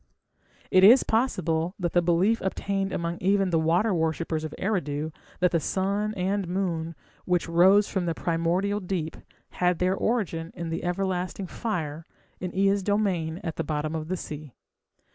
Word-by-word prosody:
It 185 - +6
is 235 +7 +8
possible 180 -7 0
that 175 -3 -2
the 175 - +4
belief 175 +6 +2
obtained 195 0 -2
among 170 0 -3
even 195 0 +2
the 165 - +3
water 175 +7 +2
worshippers 160 -1 -1
of 155 - -5
Eridu 160 -6 -1 0.3
that 180 -1 +4
the 170 - +2
sun 200 +6 -1
and 195 +1 -1
moon, 170 -3 -2 0.3
which 180 -2 +1
rose 190 +5 +5
from 185 -3 -2
the 165 - -1
primordial 175 +5 0
deep, 180 -4 -3 0.4
had 180 -1 +3
their 180 +2 +2
origin 190 -7 -1
in 170 -1 -4
the 165 +1 -3
everlasting 185 +1 -2
fire 165 -7 -4 0.3
in 180 -1 -4
Ea's 195 +1 +3
domain 190 -5 0
at 165 -3 -4
the - - -1
bottom 155 0 -2
of 155 -1 -4
the 185 +2 -2
sea. 150 -5 -8
180 Hz, 160 wpm, -26 LUFS, 165-195 Hz, 0.4 s, is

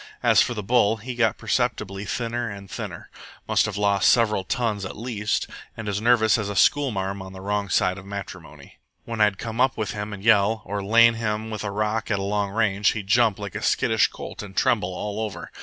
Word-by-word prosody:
As - - +5
for 120 - 0
the 105 - -4
bull, 115 0 +3
he 120 +4 -6
got 115 -4 +1
perceptibly 100 +1 -1
thinner 120 +2 -2
and 100 -1 -9
thinner - - -7 0.4
must - - +2
have - - -5
lost 100 -1 +3
several 105 -5 +2
tons 110 -1 -1
at 95 - -6
least 105 -2 -2 0.3
and 115 -2 -6
as 105 0 -2
nervous 115 -2 +4
as 105 -2 -3
a 100 - -4
schoolmarm 100 -5 +1
on 95 0 -9
the 95 - -9
wrong 100 +1 -2
side 90 +2 +1
of 95 - -13
matrimony. 85 -7 -9 0.3
When 115 -2 -4
I'd 105 -2 +3
come 115 +1 -3
up 130 -1 +2
with 110 +2 -2
him 105 -2 -5
and 100 -1 -8
yell, 110 0 +3
or 100 0 -4
lain 115 +3 +6
him 110 -1 -3
with 110 -1 -4
a 105 - -2
rock 105 +2 -2
at 105 - +1
long 100 +1 -1
range, 105 -1 +1
he'd 105 -3 -5
jump 110 0 +3
like 100 -2 -6
a - - -5
skittish - - +2
colt - - -8
and 100 -2 -11
tremble 110 -8 +2
all 105 +3 -4
over. 110 -3 -5
105 Hz, 215 wpm, -24 LUFS, 100-115 Hz, 0.4 s, lain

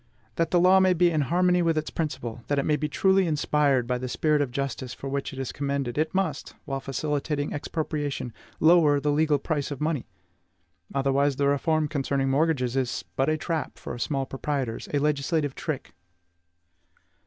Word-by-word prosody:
That 165 - +1
the 175 - +3
law 185 +2 +6
may 185 -1 +4
be 175 0 +4
in 155 -2 +1
harmony 180 +4 +2
with 165 -2 +1
its 155 - -2
principle, 120 -7 -4
that 145 - 0
it 140 - +1
may 150 - +3
be 150 +1 -2
truly 190 +2 +3
inspired 150 -4 +2
by 125 +1 -1
that 130 0 -4
spirit 150 +2 +2
of 140 - 0
justice 130 -1 -4
for 135 - -7
which 140 0 -2
it 135 - -10
is 135 -2 -3
commended, 140 -3 -2
it 155 +1 0
must 185 -8 -2
while 135 -2 -3
facilitating 145 +1 -2
expropriation 145 -5 -3 0.3
lower 160 -3 +5
the 150 +1 0
legal 150 0 +3
price 145 0 -2
of 145 -3 -5
money. 150 -4 -1 0.9
Otherwise, 140 +1 +2
the 140 +1 +1
reform 155 +2 +1
concerning 135 -2 0
mortgages 135 -4 +1
is 130 -3 -1
but 135 +3 +1
a 155 - +1
trap 160 0 -3
set - - -16
for - - -6
small 135 +1 -1
proprietors, 135 -3 -3
a 145 - +1
legislative 145 0 0
trick. 150 -2 -5
145 Hz, 185 wpm, -26 LUFS, 135-155 Hz, 0.9 s, law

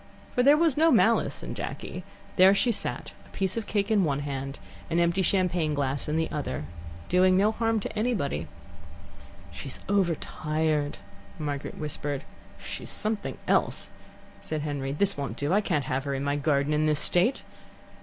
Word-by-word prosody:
For 250 - +2
there 285 +4 +6
was 320 -4 +2
no 325 +2 +5
malice - - +3
in - - -5
Jacky. - - -6 0.3
There 190 +1 +7
she 240 +4 +2
sat, 220 - -4
a - - -20
piece 190 -1 -2
of 225 -2 -3
cake 205 0 0
in 205 -3 +4
one 145 -3 0
hand, 135 -1 -4 0.3
an 165 - 0
empty 170 +2 +2
champagne 175 -4 +1
glass 140 0 -1
in 150 - 0
the 160 - +1
other, 145 - -3 0.4
doing 185 +1 +4
no 205 +3 +4
harm 225 0 0
to - - -6
anybody. 210 - -1 1.0
"She's 135 - -4
overtired," 155 -5 0 0.4
Margaret 145 -2 -4
whispered. 145 -2 -3 0.3
"She's - - -7
something 215 -1 0
else," - - +1 0.5
said 155 -1 -3
Henry. 140 -2 -3
"This 200 +7 +2
won't 140 -1 -4
do. 145 +5 0
I 205 - +4
can't 155 -9 0
have 130 +2 -2
her 140 -1 -1
in 135 - -3
my 140 0 0
garden 145 0 +1
in 155 +1 +2
this 150 -1 +2
state." 180 - +3
160 Hz, 170 wpm, -27 LUFS, 145-200 Hz, 1.0 s, There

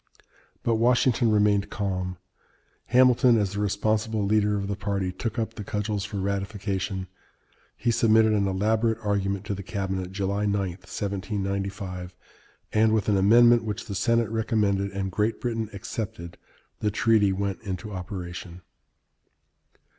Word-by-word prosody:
But 115 -1 +2
Washington 120 0 +3
remained 105 -1 +3
calm. 90 -3 -3 0.7
Hamilton, 125 -1 +5
as 100 -2 0
the 100 - -3
responsible 105 +1 0
leader 105 0 +2
of 100 -1 -3
the 100 - -2
party, 100 -2 -2
took 110 +5 -4
up 115 -1 -2
the 110 - -7
cudgels 105 0 -2
for 105 - -5
ratification. 100 -1 -2 0.7
He 120 - +1
submitted 110 -1 +4
an 100 -2 +2
elaborate 110 +4 +1
argument 100 -1 -1
to 105 - -2
the 100 - -5
cabinet 95 -1 -3
(July 100 +1 -1
9, 100 - +1 0.2
1795), 95 -1 -4 0.6
and 110 0 +4
with 110 -1 0
an 100 - +3
amendment 120 +4 +6
which 105 -2 -4
the 100 - -6
Senate 115 +2 +1
recommended 105 -3 +1
and 95 -1 -3
Great 105 +5 0
Britain 115 -3 -2
accepted, 95 -4 -6 0.4
the 105 - +1
treaty 105 -1 +3
went 95 0 -2
into 100 0 -5
operation. 90 -2 -7
100 Hz, 140 wpm, -26 LUFS, 95-110 Hz, 0.7 s, amendment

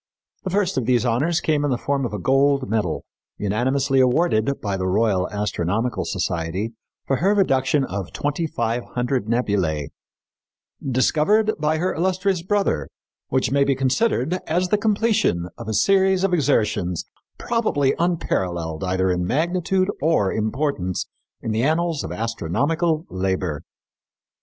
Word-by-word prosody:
The 190 - -3
first 190 -5 +1
of 120 - -4
these 125 -1 +3
honors 145 +9 +1
came 150 -2 +1
in 145 - +1
the 125 - +1
form 135 0 -1
of - - -10
a 105 - -3
gold 135 +4 +2
medal, 110 -1 -1 0.3
unanimously 130 +6 +1
awarded 130 -1 +2
by 100 -2 -2
the 95 -1 -2
Royal 95 -1 +1
Astronomical 105 +2 -1
Society 95 +3 -2 0.3
for 135 - +1
her 195 +7 +2
reduction 135 -7 +2
of 95 -3 -5
twenty 145 +3 -2
five 120 -5 -2
hundred 125 -2 -1
nebulæ 95 - 0 0.9
"discovered 155 - +2
by 155 +1 +1
her 180 +3 0
illustrious 185 +1 0
brother, 195 - 0 0.4
which 130 0 0
may 140 0 +4
be 140 -1 +2
considered 135 - +1
as 180 +3 0
the 210 - +3
completion 210 - +1
of - - -9
a 110 - -2
series 190 - +3
of 195 -2 +1
exertions 105 - +1 0.3
probably 215 - +1
unparalleled 90 - -1
either 95 0 +1
in 90 0 -1
magnitude 180 - +1
or 150 -12 +2
importance 110 - -1 0.4
in 115 - -2
the 110 +1 0
annals 160 +2 +1
of - - -5
astronomical 145 - -1
labor." 90 -5 -1
130 Hz, 145 wpm, -22 LUFS, 105-165 Hz, 0.9 s, may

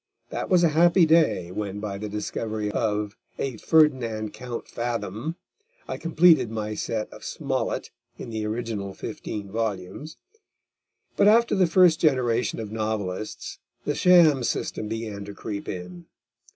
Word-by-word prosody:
That - - -3
was 180 -2 +4
a 170 - +5
happy 170 +3 +5
day, 155 - +3
when 100 0 -4
by 100 -2 -4
the 105 0 -5
discovery 105 0 -3
of 105 -1 -1 0.2
a 130 -4 -3
Ferdinand 120 -9 +2
Count 120 +2 -6
Fathom, 115 - -3 0.5
I - - -4
completed 165 -6 +4
my 110 -1 -3
set 110 0 -2
of - - -12
Smollett - - -3 0.3
in - - -7
the 110 -1 -3
original 105 -3 -4
fifteen 100 -2 -6
volumes. 110 - -4 1.0
But 200 - +4
after 235 +2 +5
the 190 -3 +4
first 170 -1 +5
generation 125 - +1
of 110 -2 -5
novelists, 110 -2 -4 0.3
the 145 - 0
sham 160 -5 +5
system 110 - -2
began 110 -2 -4
to 100 0 -9
creep 100 -1 -5
in. 90 -1 -7
110 Hz, 140 wpm, -25 LUFS, 105-155 Hz, 1.0 s, a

